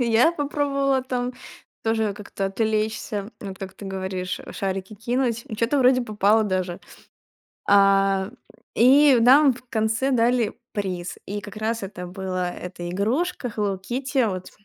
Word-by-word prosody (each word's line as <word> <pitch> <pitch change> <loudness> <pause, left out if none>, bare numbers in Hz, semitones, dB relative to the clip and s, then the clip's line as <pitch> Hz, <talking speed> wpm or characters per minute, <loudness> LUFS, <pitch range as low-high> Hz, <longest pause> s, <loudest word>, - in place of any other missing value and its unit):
и 245 - +2
я 245 +10 +5
попробовала 280 -3 0
там 250 -1 -2 0.5
тоже 220 -2 0
как-то 200 -1 -5
отвлечься, 215 0 -2
вот 195 -2 -7
как 190 -1 -7
ты 200 - -11
говоришь, 190 -1 -4
а, - - -10
шарики 195 +1 -3
кинуть, 235 +2 -1
и 220 - -6
что-то 235 +6 +1
вроде 255 0 +5
попало 215 0 +3
даже. 185 -3 -2 0.9
А, 195 -1 +4 0.5
и 270 +2 +6
нам 265 +3 +6
в 250 - -14
конце 220 +3 0
дали 235 -2 +2 0.2
приз. 185 -4 -3
И 205 +1 -4
как 205 +1 -10
раз 220 0 -2
это 180 -2 -7
была 185 -1 -3
эта 175 -1 -7
игрушка 245 - -1
Hello 200 -3 -1
Kitty, 260 +2 0
вот 185 -1 -5
215 Hz, 150 wpm, -24 LUFS, 195-250 Hz, 0.9 s, и